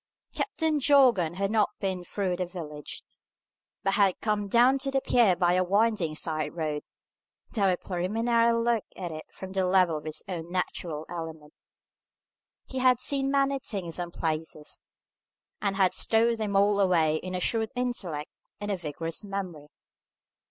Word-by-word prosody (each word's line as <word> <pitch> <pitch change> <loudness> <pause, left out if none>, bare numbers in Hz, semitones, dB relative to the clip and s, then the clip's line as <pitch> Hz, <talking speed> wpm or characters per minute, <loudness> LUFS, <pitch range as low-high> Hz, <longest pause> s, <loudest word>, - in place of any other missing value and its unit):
Captain 320 -7 0
Jorgan 250 - +4
had 195 +2 -1
not 215 -2 +3
been 190 -3 -2
through 185 0 -2
the 180 -1 -2
village, 150 -5 -7 0.8
but 195 - +1
had 195 -3 +3
come 210 -2 0
down 245 +6 +4
to 275 +1 -2
the 270 0 +1
pier 235 -8 +4
by 175 0 +2
a 185 0 +3
winding 200 -4 +1
side 155 0 -2
road, 155 -3 -2 0.7
to 220 - -1
have 195 - +5
a 180 - +2
preliminary 225 +7 +1
look 230 -1 +1
at 175 -3 -5
it 155 0 -7
from 190 0 -9
the 190 0 0
level 180 -3 +3
of 150 - -16
his 155 -1 -3
own 170 -3 -5
natural 170 -4 -3
element. 160 -3 -7 1.1
He 260 - -5
had 255 -2 +4
seen 275 -1 0
many 275 0 +2
things 185 -9 -4
and 175 -1 -4
places, 155 -2 -4 0.8
and 200 -2 0
had 190 -2 +3
stowed 230 +1 +2
them 210 -2 -2
all 200 +1 +4
away 165 -5 +3
in 185 +3 -5
a - - -1
shrewd 220 +4 0
intellect 190 -11 -3 0.3
and 205 0 -3
a 195 - 0
vigorous 165 +2 -4
memory. 185 -7 -5
190 Hz, 165 wpm, -28 LUFS, 170-230 Hz, 1.1 s, have